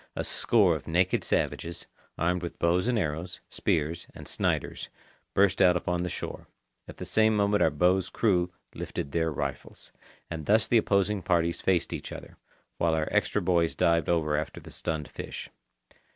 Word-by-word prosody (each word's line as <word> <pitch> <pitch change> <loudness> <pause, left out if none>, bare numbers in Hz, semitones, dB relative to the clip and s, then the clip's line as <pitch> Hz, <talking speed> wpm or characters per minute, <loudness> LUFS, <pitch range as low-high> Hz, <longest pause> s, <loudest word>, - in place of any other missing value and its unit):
A - - -2
score 100 -8 +3
of 75 - -7
naked 90 +3 +2
savages, 85 +1 -1 0.3
armed 90 +2 +1
with 85 - -6
bows 90 +5 +2
and 125 -2 +2
arrows, 80 -1 -2
spears, 80 +2 -1
and - - -10
Sniders, - - -1 0.5
burst 100 -1 +4
out 90 -2 +6
upon 90 0 -1
the 90 - -2
shore. - - -6 0.4
At - - -10
the - - -6
same 110 0 +3
moment 100 0 +2
our - - +5
boat's 90 +5 +2
crew 90 -5 +1 0.2
lifted 70 - -5
their 80 0 +1
rifles. 70 -2 -5 0.4
And 80 -3 -6
thus 110 +2 +4
the 120 - +5
opposing 100 -1 +1
parties 85 -2 +1
faced 90 -3 +1
each - - -6
other, - - -9 0.4
while 80 -1 +2
our 80 -1 -1
extra 105 - +1
boys 85 -2 +2
dived 85 -2 +2
over 80 -3 +2
after 75 +1 -3
the - - -12
stunned 80 -2 -3
fish. - - -7
85 Hz, 170 wpm, -28 LUFS, 80-95 Hz, 0.5 s, out